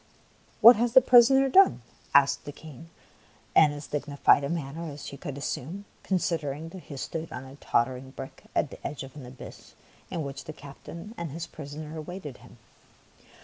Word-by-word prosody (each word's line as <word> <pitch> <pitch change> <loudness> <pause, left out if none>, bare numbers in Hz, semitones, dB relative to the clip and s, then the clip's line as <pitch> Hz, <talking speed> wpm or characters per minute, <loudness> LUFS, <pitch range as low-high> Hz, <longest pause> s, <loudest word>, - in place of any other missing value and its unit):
'' - - -33
What 235 +1 +10
has 235 +1 0
the 260 - +10
prisoner 255 +2 +6
done? 375 - +5
" - - -29
asked 140 0 +4
the 145 - -5
King 155 +1 -12 0.7
in 155 -2 +7
as 145 0 -7
dignified 145 -1 +2
a 140 - -2
manner 165 0 -4
as 145 0 -9
he - - -7
could 140 -1 -6
assume, 155 +7 -5 0.2
considering 165 -5 -2
that 185 +1 -11
he 140 - -8
stood 160 +4 -5
on - - -6
a 130 +1 -12
totter 125 -1 +1
ing 130 +1 -11
brick 135 0 -10
at 145 - +1
the - - -10
edge 140 -1 -6
of 135 -1 -11
the 140 -4 -10
abyss 125 +1 -12 0.3
in 165 - -3
which 140 -1 -7
the 155 - -7
captain 165 +8 -10
and 170 -2 -4
his 165 +4 -5
prisoner 155 0 -8
awaited 155 -4 -7
him. - - -17
150 Hz, 190 wpm, -27 LUFS, 140-170 Hz, 0.7 s, What